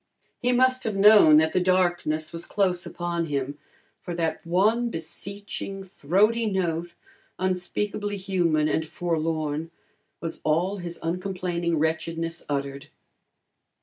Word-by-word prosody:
He 250 0 +1
must 255 +1 +3
have 215 -3 -2
known 200 -6 +8
that 160 +1 +3
the - - +3
darkness 175 -4 +1
was 165 0 -6
close 185 -3 0
upon 170 -1 -2
him, 140 -1 -3 0.4
for 175 - -5
that 165 -2 -2
one 215 +8 +2
beseeching, 195 +2 -6
throaty 205 +6 +1
note, 175 -3 -1 0.4
unspeakably 200 +3 -2
human 175 -5 +1
and 160 - +1
forlorn, 160 -1 -2 0.5
was 165 - -6
all 175 +6 +1
his 175 -2 -6
uncomplaining 175 -1 -1
wretchedness 165 +1 -1
uttered. 140 +1 -3
175 Hz, 115 wpm, -26 LUFS, 160-195 Hz, 0.5 s, known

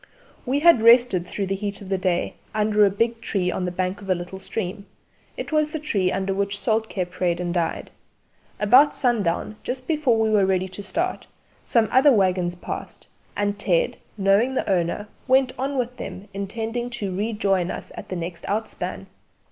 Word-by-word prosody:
We 275 +3 +1
had 335 -8 +6
rested 230 -6 +5
through 200 - -3
the 195 - -2
heat 200 0 -4
of 195 - -10
the 195 - +1
day 180 -2 0 0.2
under 210 0 +3
a - - +3
big 230 +3 -1
tree 180 -3 -1
on 180 - -2
the 180 - -2
bank 185 +2 -2
of 195 - -10
a 185 - +4
little 180 +2 -7
stream; 200 0 -4 0.5
it - - -5
was 305 -1 +2
the 315 - -2
tree 205 -12 0
under 195 0 -1
which 200 +1 -1
Soltké 220 -5 0
prayed 175 -1 -1
and 175 -1 -2
died. 170 -2 -2 0.7
About 255 +8 +6
sundown, 215 -4 0
just 255 0 -5
before 295 -8 +2
we 220 -1 +2
were 210 -2 +4
ready 185 -1 +1
to 185 +2 -8
start, 330 - -2 0.4
some 230 -2 +2
other 270 +3 +6
waggons 185 -5 +2
passed, 175 - -7 0.3
and 205 0 -1
Ted, 180 -5 +1 0.2
knowing 205 +6 +3
the - - -1
owner, 190 +2 0 0.2
went 260 -1 +4
on 275 +1 -1
with 250 0 -2
him 190 +2 -7
intending 225 +5 -3
to 200 -6 -4
rejoin 200 -3 0
us - - -6
at - - -9
the 185 - -3
next 170 0 -5
outspan. 220 +2 -3
205 Hz, 185 wpm, -23 LUFS, 185-235 Hz, 0.7 s, had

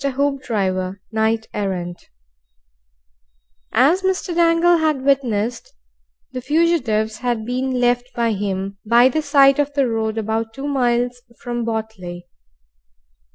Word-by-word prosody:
HOOPDRIVER, 225 -9 -1
KNIGHT 220 0 0
ERRANT 180 -4 -4 1.6
As 300 +10 +3
Mr. 375 -2 -1
Dangle 335 0 +4
bad 305 -4 0
witnessed, 245 -4 0 0.6
the 255 - -5
fugitives 255 -8 +1
had 240 -3 -2
been 255 +1 -2
left 245 +1 +1
by 235 -1 +1
him 195 -1 -3
by 235 +3 +5
the 310 +4 -1
side 275 -2 +4
of 290 0 +1
the 280 -2 +2
road 220 -1 -2
about 225 +1 -2
two 270 - -6
miles 245 -2 0 0.2
from 240 -1 -3
Botley. 220 -6 -5
240 Hz, 115 wpm, -20 LUFS, 220-275 Hz, 1.6 s, by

